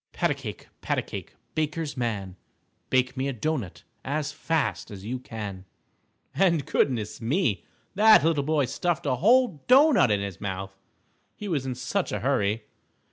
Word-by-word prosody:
Pat - - +1
a - - +3
cake, - - -8
pat - - -1
a - - 0
cake, - - -8 0.2
Baker's 155 0 -2
man, 105 -7 -3 0.5
Bake 130 0 +2
me 130 +1 -1
a 140 - -2
doughnut 125 - -3 0.2
As 145 +1 -2
fast 160 +1 -1
as 100 -1 -9
you 125 +3 -3
can. 105 -6 -7 0.7
And 170 -7 +2
goodness 110 -6 0
me! 120 - 0 0.3
that 215 -4 +7
little 160 -2 +2
boy 150 -1 +2
stuffed 175 +6 -1
a 130 -3 +1
whole 225 - +3
doughnut 270 - +6
into 100 -1 +1
his 95 -2 -8
mouth, 95 -1 -4 0.6
he 210 - -7
was 145 -8 -1
in 130 - -2
such 180 +9 -2
a - - -2
hurry. 115 -5 +1
135 Hz, 165 wpm, -26 LUFS, 110-165 Hz, 0.7 s, that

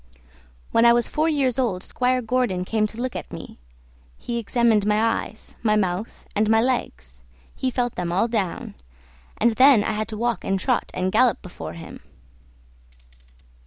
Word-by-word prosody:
When 230 - +4
I 235 0 +7
was 240 -1 +2
four 310 +2 0
years 270 -5 0
old 200 -8 -1
Squire 255 0 0
Gordon 225 -6 0
came 215 +1 +1
to 220 +2 -10
look 255 0 -3
at - - -6
me. - - -9 0.6
He 235 0 -4
examined 230 -1 +2
my 210 +1 +2
eyes, 225 -1 -2
my 215 -2 +2
mouth, 190 +1 -2
and 210 +1 +2
my 225 0 +5
legs; 65 - -2 0.3
he 260 - -1
felt 245 -1 -1
them 175 -1 -3
all 190 +6 +2
down; 210 -7 -3 0.6
and 235 +2 +3
then 255 -1 +6
I - - -1
had 215 0 -2
to 220 -1 -6
walk 235 -3 -1
and 195 0 0
trot - - 0
and 185 +1 -1
gallop 240 +3 +3
before 180 - -8
him. 165 -1 -10
225 Hz, 170 wpm, -23 LUFS, 195-245 Hz, 0.6 s, I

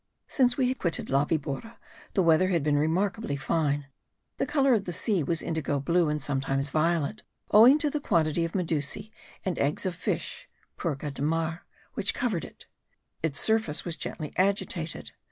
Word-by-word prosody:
Since 250 -3 +2
we 260 -2 +2
had 260 - -3
quitted 170 -6 -2
La 140 +2 +3
Vibora 155 +8 -3 0.4
the 190 - +3
weather 165 +2 +4
had 170 -5 +1
been 150 0 +2
remarkably 185 +5 0
fine; 145 -1 0 0.5
the - - -1
colour 275 -3 +3
of 205 -4 +1
the 175 - -3
sea 195 +1 +1
was 160 +3 0
indigo 155 -3 -1
blue 170 +3 +2
and 150 0 -1
sometimes 135 0 -1
violet, 165 +5 0 0.3
owing 235 +7 +8
to 300 -1 +2
the 300 - -1
quantity 165 - +1
of 165 - -3
medusae 165 +3 -1 0.3
and 185 -3 -1
eggs 145 +7 +1
of 185 - 0
fish 175 - -4 0.3
(purga 145 -4 -3
de 135 - -8
mar) 165 +2 -1 0.3
which - - 0
covered 205 - -1
it. - - -13 0.6
Its 155 -3 0
surface 220 -9 +1
was 170 -2 -1
gently 155 -2 -5
agitated. 185 -4 0
165 Hz, 170 wpm, -28 LUFS, 150-200 Hz, 0.6 s, owing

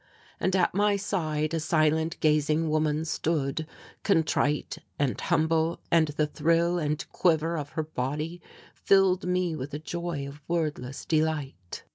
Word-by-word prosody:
And 190 0 +1
at 185 -2 +2
my 205 +2 +3
side 160 -6 -1
a 165 - +1
silent 160 0 +1
gazing 155 +1 +2
woman 155 0 +1
stood, 155 -2 -1 0.3
contrite 160 -5 +1 0.2
and 140 -3 0
humble 160 +1 +1
and 165 -2 +5
the 150 +1 0
thrill 170 +3 +1
and 150 -1 -1
quiver 165 -1 +2
of 145 -3 -5
her 160 - -1
body 155 +4 -4 0.3
filled 190 -2 +3
me 180 -2 0
with 140 0 -5
a - - -1
joy 165 -2 -4
of 140 +2 -11
wordless 150 -6 -2
delight. 150 - -2
160 Hz, 140 wpm, -27 LUFS, 150-170 Hz, 0.3 s, and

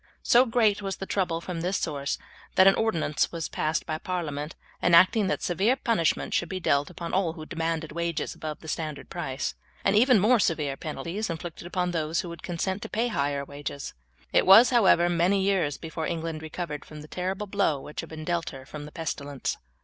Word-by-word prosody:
So 250 +2 +5
great 220 -3 +3
was 195 -1 -3
the 195 - -6
trouble 180 -4 -1
from 170 -1 -5
this 185 +3 0
source 140 -3 -2 0.4
that 185 - +7
an 195 - +8
ordinance 170 -10 0
was 165 -2 -3
passed 155 +1 -1
by 155 -1 -3
parliament 155 -5 -4 0.3
enacting 185 +4 +5
that 200 - -1
severe 195 +8 +2
punishment 230 - 0
should 170 - 0
be 185 - -3
dealt 140 -4 +1
upon 170 -1 -6
all 180 -3 +1
who 155 -2 -8
demanded 165 -1 -2
wages 170 -1 -2
above 155 -1 -6
the 160 - -11
standard 155 -3 -4
price, 135 +1 -3 0.3
and 195 - +3
even 245 +1 +6
more 225 +5 +4
severe 150 -7 +1
penalties 175 +8 -4
inflicted 170 +1 -6
upon 180 0 -1
those 160 -1 0
who 175 - -7
should 170 - -9
consent 185 +3 -2
to - - -6
pay 235 +3 0
higher 140 -7 -1
wages. 140 0 -6 0.4
It - - +4
was, 220 +7 +9
however, 190 -7 +5
many 175 +3 +2
years 185 -7 +1
before 160 -1 -4
England 165 -1 -3
recovered 155 -2 -5
from 150 -1 -10
the 150 - -11
terrible 190 +5 -3
blow 195 -8 +1
which 150 - -8
had - - -10
been 155 -1 -7
dealt 170 0 -1
her 135 -4 -10
from 145 +2 -8
the 150 - -10
pestilence. 145 -4 -3
170 Hz, 200 wpm, -27 LUFS, 155-190 Hz, 0.4 s, was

